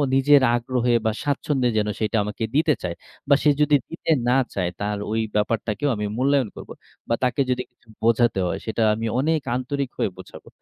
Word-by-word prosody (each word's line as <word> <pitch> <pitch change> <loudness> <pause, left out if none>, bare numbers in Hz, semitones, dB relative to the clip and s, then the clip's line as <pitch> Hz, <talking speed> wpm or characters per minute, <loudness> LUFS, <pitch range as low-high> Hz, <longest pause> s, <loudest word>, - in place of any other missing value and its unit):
নিজের 140 +1 +5
আগ্রহে 120 0 0
বা 110 - +3
স্বাচ্ছন্দ্যে 140 -3 0
যেন 105 -1 +1
সেটা 110 +1 0
আমাকে 105 +2 -5
দিতে 155 +1 +4
চায়। 85 -2 -3 0.3
বা 140 - +7
সে 150 - +5
যদি 150 0 +4
দিতে 165 0 -3 0.2
না 125 +2 +4 0.2
চায়, 90 -3 -1
তার 105 0 -1
ওই 110 - 0 0.2
ব্যাপারটাকেও 105 +4 0
আমি 105 0 -3
মূল্যায়ন 135 -2 +2
করবো। - - -9 0.4
বা 115 - +3
তাকে 125 +2 +1
যদি 125 0 0
কিছু 120 - -35 0.2
বোঝাতে 115 -2 +3
হয় - - -3
সেটা 110 +1 -2
আমি 110 +1 -3
অনেক 155 +3 +1
আন্তরিক 135 +1 -2
হয়ে - - 0
বোঝাবো। - - -12
125 Hz, 185 wpm, -23 LUFS, 110-140 Hz, 0.4 s, বা